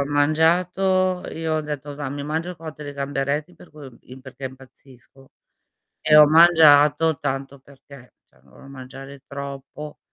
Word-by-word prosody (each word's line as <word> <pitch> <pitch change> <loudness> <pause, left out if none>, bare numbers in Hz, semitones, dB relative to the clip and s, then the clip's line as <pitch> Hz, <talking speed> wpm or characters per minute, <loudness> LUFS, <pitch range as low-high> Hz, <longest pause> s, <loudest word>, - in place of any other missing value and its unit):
ho - - -1
mangiato, 180 +5 +1
io 160 -1 -3
ho 155 - 0
detto: 145 -1 -7
"Va', 145 -2 -5
mi 145 +1 -6
mangio 160 +4 -3
il 180 - -10
cotto 155 -2 -10
di 145 - -7
gamberetti." 140 +4 -3
Per - - -17
cui, 150 -2 -12
uhm, 130 - -15
im 130 +1 -13
perché 130 +1 -12
impazzisco 130 0 -14 0.7
e 155 -1 +3
ho 150 0 +9
mangiato 155 -1 +5
tanto 135 0 -4
perché, 140 -1 -17
cioè - - -31
non 70 - -25
volevo 135 - -16
mangiare 135 +1 -11
troppo 140 +1 -9
145 Hz, 165 wpm, -22 LUFS, 135-155 Hz, 0.7 s, ho